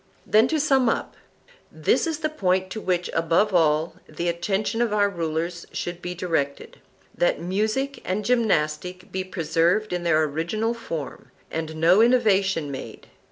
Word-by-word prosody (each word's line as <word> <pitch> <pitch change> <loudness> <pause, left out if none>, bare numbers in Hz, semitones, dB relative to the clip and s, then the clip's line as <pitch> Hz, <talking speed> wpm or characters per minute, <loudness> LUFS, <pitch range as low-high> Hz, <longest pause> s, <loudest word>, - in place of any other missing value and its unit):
Then 220 +3 +4
to 315 +3 0
sum 270 -5 +3
up: - - -2 0.6
This - - +1
is 320 -1 -3
the 310 - 0
point 185 -9 0
to 220 - -5
which, 180 -2 0
above 165 +5 +2
all, 160 -1 +2
the 175 0 -2
attention 195 +6 -1
of 235 -3 +1
our 205 -1 +3
rulers 170 -1 -3
should 175 0 -4
be 180 0 -5
directed,—that 170 - -3
music 215 +10 -1
and 200 +3 -2
gymnastic 185 -5 0
be 190 0 -2
preserved 180 +3 0
in 180 - -1
their 165 -2 +3
original 170 +10 -1
form, 165 - -6 0.2
and 160 0 -4
no 170 +6 +5
innovation 200 - +3
made. 130 -4 -8
185 Hz, 150 wpm, -24 LUFS, 165-220 Hz, 0.6 s, no